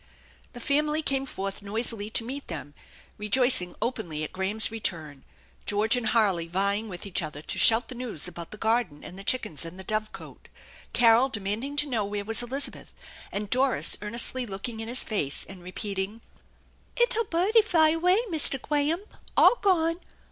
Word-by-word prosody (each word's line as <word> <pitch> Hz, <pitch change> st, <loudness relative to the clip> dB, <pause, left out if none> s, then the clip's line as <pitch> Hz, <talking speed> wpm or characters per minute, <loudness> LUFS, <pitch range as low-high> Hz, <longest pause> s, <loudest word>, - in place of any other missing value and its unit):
The 245 Hz, -, -9 dB
family 300 Hz, +4 st, 0 dB
came 270 Hz, -2 st, 0 dB
forth 195 Hz, -4 st, -5 dB
noisily 215 Hz, +1 st, -3 dB
to 225 Hz, -, -1 dB
meet 275 Hz, +3 st, -6 dB
them, 145 Hz, -3 st, -7 dB, 0.5 s
rejoicing 210 Hz, -4 st, +2 dB
openly 195 Hz, -11 st, -3 dB
at 155 Hz, -, -6 dB
Graham's 200 Hz, +4 st, +3 dB
return, 160 Hz, -10 st, -4 dB, 0.4 s
George 210 Hz, +3 st, +2 dB
and 245 Hz, -2 st, -2 dB
Harley 195 Hz, -8 st, +2 dB
vying 200 Hz, +5 st, 0 dB
with 180 Hz, 0 st, -8 dB
each 195 Hz, -, 0 dB
other 155 Hz, -2 st, -6 dB
to -, -, -2 dB
shout 225 Hz, +1 st, +6 dB
the -, -, -7 dB
news 240 Hz, -, -2 dB
about 170 Hz, -1 st, -8 dB
the 210 Hz, -, -8 dB
garden 220 Hz, -9 st, 0 dB
and 180 Hz, -, -9 dB
the 195 Hz, -, -9 dB
chickens 195 Hz, -, 0 dB
and 165 Hz, +2 st, -8 dB
the -, -, -7 dB
dove 215 Hz, +2 st, -2 dB
cote; -, -, -12 dB, 0.4 s
Carol 235 Hz, +2 st, +4 dB
demanding 220 Hz, +6 st, -3 dB
to 295 Hz, 0 st, +1 dB
know 235 Hz, -6 st, 0 dB
where 205 Hz, 0 st, -4 dB
was 225 Hz, +2 st, +2 dB
Elizabeth; 265 Hz, +4 st, -5 dB, 0.4 s
and 205 Hz, 0 st, -5 dB
Doris 260 Hz, +1 st, +4 dB
earnestly 235 Hz, +4 st, +1 dB
looking 205 Hz, +3 st, -6 dB
in 225 Hz, -, -5 dB
his 245 Hz, +2 st, +3 dB
face 145 Hz, -11 st, 0 dB
and 190 Hz, -2 st, -12 dB
repeating: 195 Hz, +3 st, -5 dB, 0.8 s
"Ickle 475 Hz, -1 st, +3 dB
budie 395 Hz, +6 st, +3 dB
fy 325 Hz, -7 st, +4 dB
away, 355 Hz, +4 st, +3 dB
Mistah 305 Hz, -4 st, +3 dB
Gwaham. 295 Hz, +6 st, 0 dB, 0.3 s
All 485 Hz, -, +6 dB
gone! 335 Hz, -4 st, +2 dB
225 Hz, 170 wpm, -26 LUFS, 195-270 Hz, 0.8 s, shout